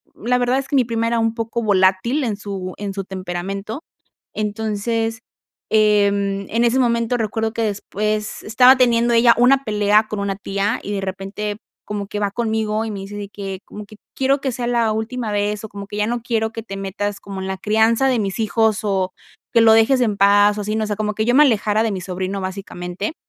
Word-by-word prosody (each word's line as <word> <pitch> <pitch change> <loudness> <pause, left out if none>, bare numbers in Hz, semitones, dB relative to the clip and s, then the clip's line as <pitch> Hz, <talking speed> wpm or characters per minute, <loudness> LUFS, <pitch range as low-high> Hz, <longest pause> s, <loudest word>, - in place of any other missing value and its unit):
la 250 +3 0
verdad 250 +2 +1
es 275 - -4
que 280 - 0
mi 255 - +4
prima 230 0 -1
era 235 0 +1
un 225 0 +1
poco 230 0 -3
volátil 195 +7 +2
en 215 -4 -1
su 195 -3 -6
en 200 -1 -4
su 195 - -3
temperamento, 195 - -5 0.5
entonces, 220 +2 -2 0.5
em, 200 -2 +2
en 230 +2 +1
ese 240 +3 +3
momento 235 0 +1
recuerdo 220 -1 -2
que 230 - -2
después 210 0 -2
estaba 250 +4 +6
teniendo 240 -1 +3
ella 235 0 +6
una 265 +3 +4
pelea 210 0 +3
con 210 -2 -4
una 195 -1 -2
tía 200 +3 -1
y 205 - -4
de 200 - -1
repente, 195 +2 -4 0.3
como 205 -1 -4
que 210 - -4
va 200 -1 0
conmigo 220 -1 -1
y 220 - -4
me 200 - -5
dice 195 +1 -8
de 205 -1 -6
que, 195 -2 -6
como 210 0 -10
que: 215 - -14 0.2
"Quiero 270 +1 +2
que 265 -2 -2
sea 240 0 -3
la 230 -3 +2
última 220 +1 -3
vez, 205 +1 -1
o - - -6
como 200 0 -8
que 210 - -7
ya 210 - +1
no 235 0 -2
quiero 225 -1 -1
que 225 - -6
te 195 -3 -7
metas 200 +1 -3
como 195 -1 -7
en 190 - -4
la 190 -1 -3
crianza 220 +4 +2
de 250 -3 +2
mis 195 0 -3
hijos, 220 0 +1
o 190 -2 0 0.4
que 230 - +5
lo 225 - +7
dejes 240 +4 +4
en 210 -4 +1
paz", 205 +1 +4
o - - -2
así, 215 +2 -2
¿no?, 220 - 0
o - - -3
sea, 210 - -2
como 210 -1 -2
que 220 - -1
yo 245 - +3
me 295 - +7
alejara 215 -4 +2
de 225 - 0
mi 190 - -3
sobrino 185 +2 -4
básicamente. 185 - -5
215 Hz, 225 wpm, -20 LUFS, 200-230 Hz, 0.5 s, lo